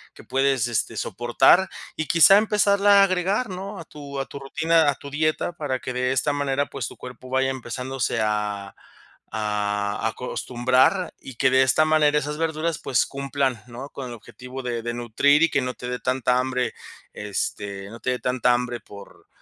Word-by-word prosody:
que - - -13
puedes, 135 -1 +1
este, 120 -3 -2
soportar. 120 +10 +3 0.3
Y 155 - -3
quizá, 170 +4 +7
empezarla 205 -1 +4
a - - +8
agregar, 190 +5 0
¿no?, 195 +2 -6
a 165 - -9
tu 140 -2 -8
a 135 - -2
tu 140 - -9
rutina, 160 +3 +2
a 140 - 0
tu 140 - -10
dieta, 155 +3 0
para 145 -6 -3
que 130 - -5
de 125 0 0
esta 145 +3 +1
manera, 140 0 0
pues 135 -4 -5
tu - - -11
cuerpo 125 0 -10
vaya 135 +1 +1
empezándose 130 +1 -3
a 105 -2 -2 0.6
a 105 -1 -1
acostumbrar. 130 - +1
Y 130 - -10
que 130 +3 +3
de 130 0 +5
esta 135 +4 +3
manera, 155 -1 +3
esas 150 +1 -4
verduras, 165 0 -1
pues 130 - +1
cumplan, 140 -3 -2
¿no?, 125 +4 -8
con 135 -2 -6
el - - -7
objetivo 125 +3 -10
de 120 -2 -3
de 120 0 -3
nutrir, 140 +6 +3
y 165 - +4
que 140 - +2
no 125 0 -3
te 125 - -7
de 125 0 -3
tanta 125 -1 +1
hambre. 125 -1 -1 0.4
Este, 100 -1 -4
no 115 - -10
te - - -2
de 125 - -2
tanta 125 -1 +1
hambre 120 0 -2
por 100 -1 -14
130 Hz, 190 wpm, -24 LUFS, 120-150 Hz, 0.6 s, a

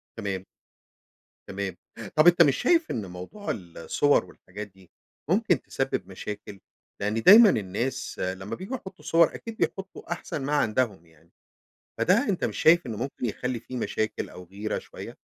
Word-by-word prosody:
تمام. 100 -4 -4 1.0
تمام، 100 -1 -4 0.4
طب 155 +2 +6
أنت 175 0 +7
مش 140 -5 +5
شايف 330 +4 +2
إن 110 -6 -3
موضوع 90 - -6
الصور 95 - +1
والحاجات 100 +3 -9
دي 95 -3 -22 0.4
ممكن - - +2
تسبب - - -2
مشاكل؟ 105 -1 -7 0.4
لأن 105 +3 0
دايمًا 215 +3 +10
الناس 115 - -2
لما 95 +2 -3
بييجوا 195 +8 -5
يحطوا 190 -10 -10
صور 165 0 +4
أكيد 225 -1 -8
بيحطوا 195 -3 -3
أحسن 175 -3 -4
ما 145 - -1
عندهم 110 - 0
يعني، 80 0 -25 0.7
فده - - +3
أنت - - 0
مش - - -2
شايف 170 -1 +5
إنه 115 -3 -4
ممكن 125 +3 -4
يخلي 125 +2 -3
في 130 +2 -8
مشاكل 110 -2 -2
أو 90 - -11
غيرة 100 +4 -4
شوية؟ - - -10
115 Hz, 155 wpm, -27 LUFS, 95-160 Hz, 1.0 s, دايمًا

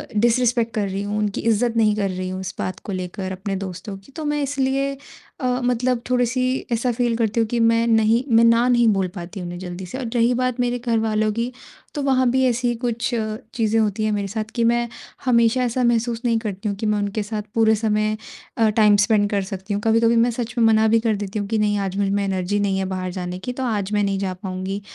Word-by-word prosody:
disrespect 235 +1 +2
कर 210 -2 +1
रही 195 +1 -3
हूँ, 205 +1 -2
उनकी 210 -1 -1
इज़्ज़त 230 +1 +1
नहीं 215 -2 +3
कर 200 -2 0
रही 185 0 -4
हूँ 185 0 -4
इस 190 +1 -5
बात 185 - -3
को - - -7
लेकर 185 0 -4
अपने 195 +1 -4
दोस्तों 190 +1 -6
की 195 +8 -18
तो 315 - -5
मैं 295 0 0
इसलिए 275 0 0 0.5
अ, 255 - -3 0.2
मतलब 245 0 +1
थोड़ी-सी 250 0 +1 0.3
ऐसा 235 +2 +1
फील 235 -1 0
करती 225 0 0
हूँ 225 - +2
कि 235 +2 -1
मैं 230 0 +3
नहीं 225 +2 +3
मैं 230 - +6
ना 230 +1 +5
नहीं 240 -2 +4
बोल 190 -1 0
पाती 180 +2 -7
उन्हें 175 0 -6
जल्दी 180 0 -6
से 185 +9 -7
और 260 - -4
रही 235 +1 +3
बात 255 0 -1
मेरे 245 0 0
घरवालों 220 -2 +1
की, 230 +3 -2 0.4
तो 290 - -3
वहाँ 260 -2 +3
भी 260 0 +2
ऐसी 245 0 0
ही 240 - 0
कुछ 235 -1 -2 0.4
चीज़ें 225 -1 +1
होती 215 0 0
हैं 215 - +1
मेरे 200 -1 -1
साथ 215 +2 -4
कि 235 - +1
मैं 235 +1 +2 0.4
हमेशा 235 0 +3
ऐसा 250 +1 0
महसूस 235 0 +1
नहीं 230 -1 +3
करती 210 -1 -4
हूँ 200 - -2
कि 220 - -4
मैं 210 0 +2
उनके 205 +1 -2
साथ 210 0 -4
पूरे 220 -1 +4
समय 215 0 0 0.4
अ, 225 -1 +4
टाइम 210 -1 +5
स्पेंड 205 -3 +2
कर 200 - +1
सकती 195 +2 -4
हूँ, 205 - -1
कभी-कभी 230 +1 +4
मैं 235 +1 +3
सच 240 0 -4
में 230 - +4
मना 220 0 +4
भी 225 +1 +4
कर 220 -2 +1
देती 205 +1 -4
हूँ 205 - -3
कि 220 +2 0
नहीं 205 -1 +2
आज 195 -1 -2
मुझ 200 -1 +1
में 200 0 0
एनर्जी 195 +1 -1
नहीं 195 -1 0
है 190 - -1
बाहर 185 -1 -3
जाने 180 0 -5
की 250 +6 -5
तो 265 - -4
आज 210 -5 -1
मैं 205 - +2
नहीं 195 -1 0
जा 190 -2 -2
पाऊँगी, 190 +1 -5
220 Hz, 245 wpm, -22 LUFS, 200-235 Hz, 0.5 s, मैं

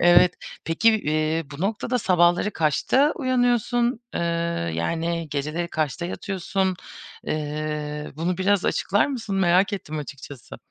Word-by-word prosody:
evet. 175 +1 +6 0.3
Peki, 165 +8 +3
eee, 155 +1 0
bu 140 +1 -9
noktada 225 +5 -1
sabahları 180 0 +3
kaçta 210 - +2
uyanıyorsun? 245 -2 +1
Eee, - - -1 0.5
yani, 165 - -2
geceleri 155 +4 -2
kaçta 155 +2 -2
yatıyorsun? 190 0 -2 0.5
Eee, 150 0 -3
bunu 175 +3 -1
biraz 195 0 +2
açıklar 205 - +2
mısın? 225 -8 -3
Merak 185 +2 +3
ettim 155 -6 -4
açıkçası. 140 -2 -9
175 Hz, 120 wpm, -24 LUFS, 155-205 Hz, 0.5 s, evet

